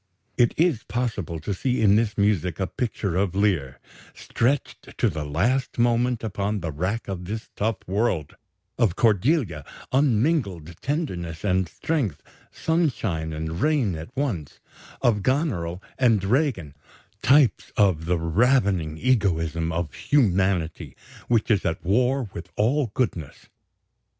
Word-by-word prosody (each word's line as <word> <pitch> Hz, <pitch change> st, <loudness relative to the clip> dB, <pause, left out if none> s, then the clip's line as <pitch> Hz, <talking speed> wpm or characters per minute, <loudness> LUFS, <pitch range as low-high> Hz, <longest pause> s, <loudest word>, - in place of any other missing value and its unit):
It 120 Hz, -2 st, +3 dB
is 160 Hz, -8 st, +2 dB
possible 110 Hz, -9 st, -3 dB
to 100 Hz, -, -2 dB
see 125 Hz, +6 st, -1 dB
in 105 Hz, -2 st, +5 dB
this 110 Hz, -1 st, +1 dB
music 95 Hz, -5 st, +1 dB
a 95 Hz, -, +1 dB
picture 100 Hz, -4 st, -3 dB
of 95 Hz, -1 st, 0 dB
Lear, 90 Hz, -11 st, 0 dB, 0.4 s
"stretched 135 Hz, +4 st, -2 dB
to 120 Hz, -, +2 dB
the 80 Hz, -2 st, -4 dB
last 105 Hz, -, 0 dB
moment 120 Hz, 0 st, +2 dB
upon 105 Hz, -1 st, -2 dB
the 85 Hz, -2 st, -3 dB
rack 90 Hz, +10 st, -2 dB
of 90 Hz, -2 st, -5 dB
this 110 Hz, +4 st, -5 dB
tough 110 Hz, +2 st, 0 dB
world"; 95 Hz, -6 st, -1 dB, 0.4 s
of 110 Hz, -8 st, +2 dB
Cordelia, 110 Hz, -, +2 dB, 0.3 s
"unmingled 115 Hz, -, +1 dB
tenderness 90 Hz, -, -3 dB
and 95 Hz, -3 st, +1 dB
strength, 125 Hz, -, -2 dB, 0.3 s
sunshine 115 Hz, -, -1 dB
and 80 Hz, +3 st, -4 dB
rain 145 Hz, -, +2 dB
at 80 Hz, +1 st, -7 dB
once"; 110 Hz, -, -3 dB, 0.4 s
of 110 Hz, -4 st, +3 dB
Goneril 95 Hz, -, -1 dB, 0.2 s
and 115 Hz, -6 st, +3 dB
Regan, 105 Hz, -, 0 dB, 0.5 s
types 135 Hz, -5 st, +3 dB
of 95 Hz, -6 st, +3 dB
"the 90 Hz, +1 st, +1 dB
ravening 95 Hz, -, +2 dB
egoism 85 Hz, -9 st, +1 dB
in 85 Hz, 0 st, -1 dB, 0.2 s
humanity 90 Hz, -, +1 dB, 0.3 s
which 115 Hz, -1 st, +2 dB
is 100 Hz, -4 st, +2 dB
at 80 Hz, 0 st, -2 dB
war 125 Hz, +6 st, +2 dB
with 85 Hz, +2 st, -8 dB
all 125 Hz, +5 st, +1 dB
goodness." 90 Hz, -, -3 dB
100 Hz, 130 wpm, -24 LUFS, 85-125 Hz, 0.5 s, in